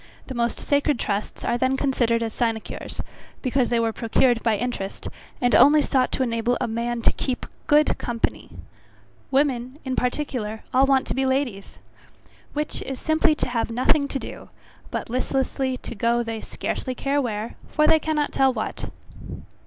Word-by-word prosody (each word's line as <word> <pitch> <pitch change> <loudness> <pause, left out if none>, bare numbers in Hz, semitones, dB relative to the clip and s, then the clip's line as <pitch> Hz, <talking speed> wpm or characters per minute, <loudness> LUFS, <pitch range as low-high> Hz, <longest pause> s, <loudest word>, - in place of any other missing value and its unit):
The 265 - -6
most 235 -1 0
sacred 285 -1 +1
trusts 205 -2 -3
are 240 - +1
then 260 +1 +2
considered 240 -4 +1
as 225 -1 -3
sinecures, 225 -2 -3 0.4
because 255 -1 +1
they 235 - +2
were 225 -1 +1
procured 235 +1 +2
by 225 -3 +2
interest, 215 -4 -4 0.3
and 245 -1 +2
only 295 +2 +7
sought 255 -2 +1
to 265 - +1
enable 235 0 0
a - - 0
man 235 +1 -2
to - - +5
keep 255 -2 -3 0.2
GOOD 300 +1 +4
COMPANY. 235 -1 -2 0.8
Women, 265 -2 +1
in 260 -1 -1
particular, 245 -5 -2
all 265 +2 +5
want 270 -1 +3
to - - -2
be 265 - 0
ladies. 260 -7 -1 0.8
Which 300 +1 -2
is 270 -1 -5
simply 315 0 +3
to 255 - -2
have 235 -2 -1
nothing 260 +5 +2
to 280 - -2
do, - - -8 0.4
but - - -3
listlessly 260 +1 -1
to - - -7
go 235 +2 +1
they 225 -1 -4
scarcely 255 -1 -4
care 280 +3 0
where, 220 -3 -3 0.2
for 305 - +2
they 315 - +6
cannot 305 -2 0
tell 270 -1 +4
what. 220 -4 -4
250 Hz, 170 wpm, -24 LUFS, 230-275 Hz, 0.8 s, only